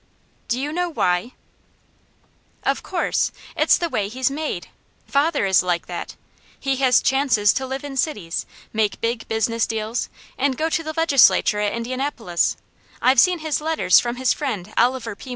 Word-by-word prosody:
"Do 245 - -1
you 290 +3 -3
know 355 +1 -1
WHY?" 180 - 0 1.3
"Of - - 0
course! - - -1 0.2
It's - - +4
the 345 - -1
way 210 -10 -1
he's 255 +4 -1
MADE! 290 - -4 0.4
Father 285 -4 +1
is 190 -2 +4
like 175 -1 -1
that! 175 -1 -6 0.4
He 270 -1 -1
has 260 -2 +4
chances 250 -7 +3
to 265 0 -3
live 265 +1 -5
in 285 -1 -6
cities, 205 - -2 0.3
make 215 -2 0
big 230 0 -2
business 225 +1 0
deals, 220 +1 -3 0.3
and 270 -1 +1
go 320 +1 0
to 325 - +1
the 315 -1 -5
legislature 275 -9 +4
at 210 -1 0
Indianapolis; 235 -6 -1 0.4
I've 255 0 +4
seen 360 +4 +5
his 305 -1 0
letters 315 -11 +4
from 240 0 -3
his 255 0 +1
friend 215 -9 -4
Oliver 235 -2 +1
P. 260 - -12
250 Hz, 165 wpm, -22 LUFS, 215-280 Hz, 1.3 s, seen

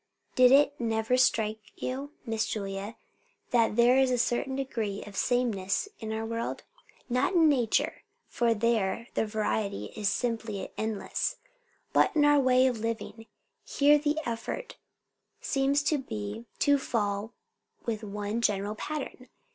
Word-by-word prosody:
Did 255 0 +6
it 285 +1 +6
never 225 +1 +1
strike 220 -4 +2 0.2
you, 275 +3 -4
Miss 225 -2 -1
Julia, 200 +1 -4 0.6
that 230 -3 +3
there 240 +3 +5
is 265 -1 +4
a 250 - +1
certain 245 +3 0
degree 225 -7 -3
of 205 - -11
sameness 235 - 0
in 220 -1 -5
our 220 0 -2
world? 230 +1 -3 0.4
Not 255 +10 +1
in 330 -2 +6
nature, 250 -7 +1 0.3
for 235 -1 +1
there 225 -1 0
the 220 - 0
variety 210 - -2
is 210 -2 0
simply 225 -4 -2
endless; 220 -1 -2 0.6
but - - +3
in 295 -1 +4
our 290 0 +5
ways 255 -1 +4
of 235 - -7
living. 225 0 -4 0.4
Here 295 +1 +4
the 295 +1 0
effort 235 - -4 0.6
seems 275 +1 +1
to 300 0 +1
be 105 - -6
to 285 -1 +3
fall 210 -3 -2 0.5
in - - -27
with 220 -2 -2
one 210 +2 -3
general 205 -2 0
pattern. 265 +1 -6
230 Hz, 145 wpm, -29 LUFS, 215-260 Hz, 0.6 s, Did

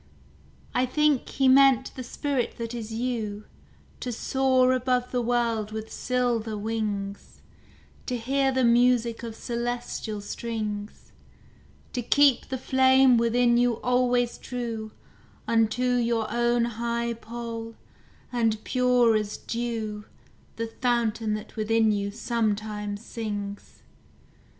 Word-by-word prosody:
I 255 +1 +2
think 300 0 +2
He 270 - +1
meant 265 -1 +5
the 260 - -7
spirit 260 -1 -2
that 230 0 -5
is 230 -2 -6
you 220 -3 -3 0.5
To 250 - -4
soar 255 +1 +2
above 250 -1 0
the 250 - 0
world 230 -3 0
with 220 0 -6
silver 240 -4 -1
wings; 205 -2 -4 0.7
To 250 - -1
hear 270 +3 +1
the 260 0 +1
music 235 -1 +3
of 230 -2 -6
celestial 240 -2 -3
strings; 210 -1 -5 0.8
To 245 - -1
keep 275 +1 +4
the 260 - -3
flame 260 -1 +5
within 240 +1 +3
you 245 0 +3
always 245 -1 +1
true 230 -3 -4 0.6
Unto 225 +1 +2
your 235 -2 +1
own 240 0 +2
high 235 0 -2
pole; 230 0 -7 0.6
and 225 -3 0
pure 250 -3 +3
as 210 -1 -1
dew 225 -3 -4 0.5
The 230 - -2
fountain 225 -2 0
that 215 - -8
within 220 0 +2
you 200 -1 -1
sometimes 210 -1 -2
sings. 205 -3 -6
235 Hz, 115 wpm, -26 LUFS, 220-250 Hz, 0.8 s, meant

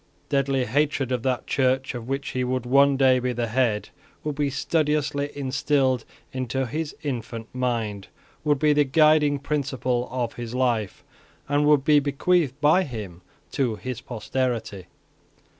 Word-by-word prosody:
Deadly 135 -2 +1
hatred 140 +1 0
of 125 -2 0
that 130 0 -1
Church 130 0 +1
of 120 -2 -7
which 135 +1 -3
he 130 - -2
would 125 0 -2
one 140 +2 +4
day 130 -1 +4
be 125 0 -1
the 120 0 -1
head 115 -3 0 0.3
would 150 - -2
be 145 0 0
studiously 150 -1 0
instilled 135 -2 0 0.3
into 130 +1 -2
his 150 +5 -4
infant 115 -5 -4
mind, 115 -6 -2 0.4
would 150 -1 +2
be 150 +2 +3
the 145 0 +4
guiding 150 0 +4
principle 130 -4 -1
of 125 -3 -2
his 120 0 -6
life, 120 -6 0 0.4
and 145 +1 +2
would 150 -3 +4
be 150 0 +5
bequeathed 145 0 +1
by 150 +5 +4
him 105 - -6 0.3
to 125 -6 0
his 125 +2 -6
posterity. 115 -4 -3
130 Hz, 150 wpm, -24 LUFS, 120-145 Hz, 0.4 s, be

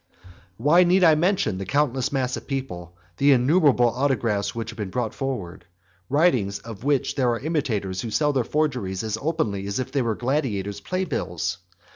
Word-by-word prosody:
XXXVIII. - - -38
Why 150 +9 +5
need 180 +2 +3
I 165 -2 +7
mention 155 - +1
the 95 - -4
countless 140 -2 +1
mass 130 -2 -1
of - - -9
papers, 130 -11 -4 0.3
the 140 0 +5
innumerable 135 -1 +4
autographs 115 -6 0
which 115 0 -4
have 115 - -14
been 105 -3 -4
brought 115 +2 -2
forward? 100 -10 -5 0.4
writings 130 - +2
of 110 +2 -10
which 140 -1 +1
there 130 -3 +1
are 115 -1 0
imitators 115 - -2
who 115 - -4
sell 150 +6 +1
their 130 -3 +1
forgeries 125 -11 -1
as 110 0 -3
openly 115 -12 -1
as 100 - -2
if 130 0 -3
they 140 -1 +1
were 115 -3 0
gladiators' 110 -7 -2
playbills. 100 - -3
125 Hz, 180 wpm, -24 LUFS, 100-145 Hz, 0.4 s, I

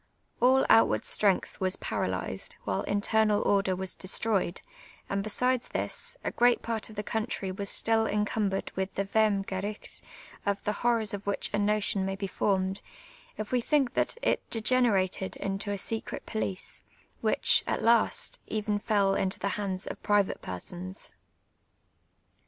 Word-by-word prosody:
All 260 +2 +5
outward 225 - +5
strenp^h 200 -3 +1
was 185 -1 +1
paralysed, 95 +1 -3
while 95 -2 -1
internal 210 +1 +2
ordi'r 195 -2 +2
was 190 0 -4
destroyed; 195 -1 0 0.5
and 200 0 -1
besides 250 +4 +1
this, - - -3
a - - -1
great 245 0 +3
part 225 -1 -3
of 215 - -11
the 210 - -3
country 215 -3 -2
was 200 +1 -4
still 225 0 +2
encumbered 210 -1 -1
with 190 0 -3
the 195 - 0
Vrhmcjorirhf, 200 -1 -1 0.4
of 200 0 -1
the 210 - 0
hoiTors 230 -2 +2
of 200 0 -6
which 200 - 0
a - - +1
notion 205 -1 +1
may 195 0 -2
be 195 +1 -4
formed, 190 0 0 0.6
if 215 -1 -5
we 250 -1 +2
think 270 -1 +2
that - - 0
it - - +2
de<::enerated 215 -5 +2
into 195 +1 -3
a 200 - -1
secret 225 +3 -4
police, 195 -4 -3 0.4
which, - - +3
at - - -1
last, 230 0 +3
even 210 -1 -1
fell 205 -2 +2
into 190 -1 0
the 200 - -1
hands 195 -2 -3
of - - -7
private 205 -2 +2
persons. 180 - -5
205 Hz, 150 wpm, -29 LUFS, 195-220 Hz, 0.6 s, All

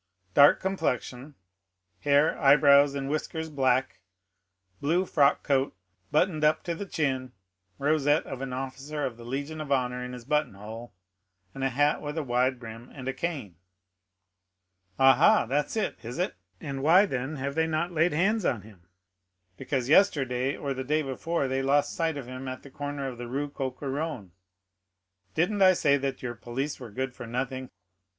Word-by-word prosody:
"Dark 145 0 +7
complexion; 145 -7 -3 0.6
hair, 145 +2 +3
eyebrows, 140 -1 +6
and 135 -1 -3
whiskers 160 +2 -3
black; 130 -6 +1 0.8
blue 170 +6 +1
frock 145 -5 +3
coat, 135 -6 0 0.3
buttoned 155 +1 +1
up 150 +1 +3
to 170 - -2
the 195 +4 -6
chin; 130 -7 -2 0.4
rosette 145 +1 +2
of 135 -1 -7
an 135 -1 -4
officer 135 +3 -4
of 125 -3 -4
the 120 - -12
Legion 140 +6 -4
of 145 -2 -6
Honor 125 -2 0
in 125 0 -6
his 125 -2 -9
button 150 -6 0
hole; 110 +4 -9 0.6
a 135 0 -1
hat 145 +3 +1
with 150 +1 -5
wide 130 -3 +1
brim, 115 +1 -10
and 130 -2 -9
a 135 - -1
cane." 135 - -4 1.4
"Ah, 135 0 +7
ha, - - +5
that's 145 - -1
it, 215 - -1
is 120 +2 -6
it?" - - 0 0.3
said - - -37
Noirtier; - - -5
"and 135 -1 -4
why, 175 +8 +6
then, 135 -3 -3
have 140 0 -3
they 160 +2 +1
not 160 +2 -1
laid 165 +1 +2
hands 195 +7 +1
on 115 - 0
him?" 100 -5 -17 0.7
"Because 130 +1 -2
yesterday, 135 -6 +3
or 140 -1 -3
the 130 0 -4
day 155 +3 +1
before, 140 +3 -2
they 130 +1 -1
lost 140 +2 +2
sight 165 -3 -1
of 140 - -6
him 130 +1 -7
at 130 0 -6
the 140 - -13
corner 145 0 -4
of 125 -2 -7
the 120 - -5
Rue 140 +4 -3
Coq 130 -3 -4
Héron." 140 - -4 1.0
"Didn't 195 +5 +1
I 185 -1 +7
say 145 -5 +3
that 135 -1 -4
your 120 -1 -3
police 120 +5 -4
were 125 -3 -8
good 130 +4 -4
for 120 - -9
nothing?" 130 +2 -3
140 Hz, 175 wpm, -27 LUFS, 130-150 Hz, 1.4 s, Dark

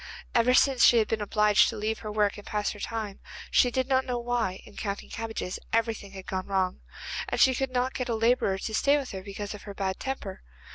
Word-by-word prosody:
Ever 245 +2 +4
since 265 -3 +4
she 240 - +7
had 220 - +3
been 220 -1 -1
obliged 210 0 +4
to 225 - -5
leave 215 +1 -2
her 215 - -6
work 210 -1 +1
and 205 - -13
pass 210 -1 -1
her 210 - -9
time, 215 -2 -4 0.3
she 250 - +5
did 260 +1 -1
not 265 -1 +3
know 250 -2 -2
why, 235 -6 -2
in 205 - -15
counting 200 -2 -4
cabbages, 225 -5 -4
everything 225 -3 -1
had 190 -1 -9
gone 185 -1 -3
wrong, 190 -2 0 0.5
and - - -2
she 260 - +6
could 270 +1 -1
not 255 0 0
get 255 -1 -3
a 230 - +1
labourer 225 -4 +2
to 220 +3 -5
stay 280 +6 +4
with 275 -3 -4
her 190 - -5
because 200 +1 -6
of 210 - -9
her 200 -1 -9
bad 190 -1 -2
temper. 260 -8 -5
220 Hz, 235 wpm, -28 LUFS, 200-245 Hz, 0.5 s, she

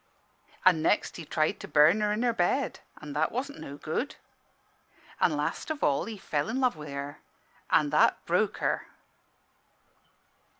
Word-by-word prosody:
"An' 180 -4 +6
next 185 - +1
he 165 - -7
tried 155 +1 0
to - - -8
burn 155 +8 +5
her 210 0 +1
in 215 +3 0
her 240 -1 +2
bed: 225 +7 0 0.2
an' 150 -2 -8
that 150 +2 +1
wasn' 275 +4 -4
no 140 - -8
good. 160 - -3 1.0
"An' - - +2
last - - -2
of 310 -2 -3
all 140 -1 +2
he 225 -2 -6
fell 150 -3 -2
i' - - -2
love 255 -4 +2
wi' 150 -1 -9
her: 140 +1 -6 0.5
an' 150 -1 +3
that 150 - +3
broke - - +1
her." - - -1
165 Hz, 165 wpm, -28 LUFS, 150-230 Hz, 1.0 s, An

